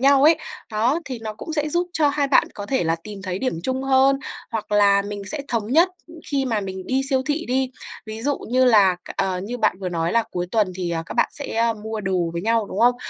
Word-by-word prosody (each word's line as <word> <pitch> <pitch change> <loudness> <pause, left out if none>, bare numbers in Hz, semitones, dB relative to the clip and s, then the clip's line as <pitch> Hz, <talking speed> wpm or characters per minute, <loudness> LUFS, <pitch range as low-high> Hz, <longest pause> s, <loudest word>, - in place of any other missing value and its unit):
nhau 275 +1 +5
ấy, 320 +1 +6 0.3
đó 230 +8 +1
thì 255 -4 -5
nó 215 -1 -5
cũng 320 - -7
sẽ 300 -1 0
giúp 345 +3 0
cho 305 -4 +3
hai 285 0 +1
bạn 275 - +4
có 205 -1 -6
thể 260 -5 0
là 165 0 +1
tìm 205 -2 -8
thấy 185 -1 -3
điểm 255 -9 -2
chung 260 0 -1
hơn 270 0 +4 0.3
hoặc 215 -2 -4
là 200 -1 +5
mình 205 0 -6
sẽ 310 - -3
thống 230 -3 -1
nhất, 335 +5 +6 0.4
khi 280 -2 0
mà 225 -5 0
mình 190 -1 -6
đi 265 +1 +1
siêu 265 -1 +2
thị 310 +3 -1
đi. 260 +1 0 0.4
Ví 220 +1 -6
dụ 285 +2 0
như 255 +2 +1
là 205 -7 +6
c - - -8
ờ, 185 -1 0
như 245 +4 -5
bạn 215 -5 +2
vừa 185 - -2
nói 170 -1 -1
là 230 - +4
cuối 175 0 -2
tuần 210 -4 +1
thì, 180 -2 -2
ờ, 165 -1 -1
các - - -7
bạn - - +3
sẽ, 285 - -5
a, 230 0 +2
mua 220 0 -5
đồ 185 -4 0
với 170 +1 -3
nhau, 225 -1 +1
đúng 200 - -4
không? 245 +1 +5
225 Hz, 260 wpm, -22 LUFS, 200-265 Hz, 0.4 s, ấy